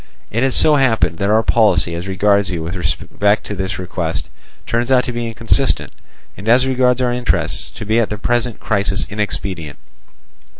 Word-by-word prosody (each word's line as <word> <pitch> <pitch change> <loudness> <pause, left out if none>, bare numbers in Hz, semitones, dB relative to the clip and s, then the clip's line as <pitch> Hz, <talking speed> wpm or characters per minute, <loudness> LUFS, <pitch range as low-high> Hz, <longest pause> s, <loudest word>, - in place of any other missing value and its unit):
It 115 - -1
has 135 -1 +2
so 150 -1 +5
happened 110 - +1
that 100 - 0
our 110 +1 +3
policy 100 -8 +3
as 85 +3 -5
regards 100 +1 +2
you 85 -3 -3
with 85 +3 -5
respect 100 +3 0
to - - -5
this 95 -2 -3
request, 85 -3 -4 0.4
turns 120 +2 -1
out 125 -1 +4
to - - -4
be 120 -1 -3
inconsistent, 115 +4 0 0.4
and 105 +3 -5
as 125 +3 +5
regards 130 -1 +2
our 120 -1 +1
interests, 125 0 -1
to - - -9
be 110 +2 +2
at 115 - +1
the 105 - -4
present 120 +1 -1
crisis 100 -2 0
inexpedient. 95 -6 -4
105 Hz, 180 wpm, -18 LUFS, 95-120 Hz, 0.4 s, so